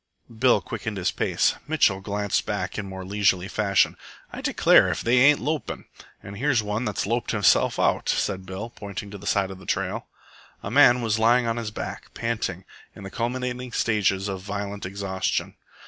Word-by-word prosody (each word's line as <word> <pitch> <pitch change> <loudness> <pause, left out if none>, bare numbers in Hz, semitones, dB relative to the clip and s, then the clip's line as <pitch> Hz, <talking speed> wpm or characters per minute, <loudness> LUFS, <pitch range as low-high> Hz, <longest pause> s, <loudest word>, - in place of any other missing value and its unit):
Bill 125 +2 +4
quickened 110 -3 -5
his 90 -1 0
pace. - - +1
Mitchell 125 -11 +2
glanced 100 +1 -1
back - - -3
in 100 - -5
more 95 -1 -7
leisurely 95 -2 +1
fashion. 100 -2 +2 0.4
"I - - -6
declare - - +4
if - - -2
they 120 +2 +4
ain't 145 +3 +6
lopin'!" 150 +2 -3 0.4
"And 100 +1 -9
here's 130 -4 +2
one 105 +4 -2
that's 105 -4 -2
loped 115 +4 -1
himself 105 -4 +3
out," - - +1
said 95 -2 0
Bill, 100 +5 -6
pointing 100 -2 -7
to 100 - -8
the 100 - -9
side 95 -1 +1
of 95 - -9
the - - -15
trail. - - -2 0.6
A 100 - -5
man 125 -2 +6
was 110 -1 0
lying 120 +2 +4
on 115 0 -1
his 115 -2 -3
back 105 - -7
panting 110 -6 -3 0.3
in - - -11
the 95 - -8
culminating 125 +1 -3
stages 100 -3 +1
of 95 -2 -4
violent 100 0 -5
exhaustion. 95 -1 -2
105 Hz, 180 wpm, -25 LUFS, 95-120 Hz, 0.6 s, ain't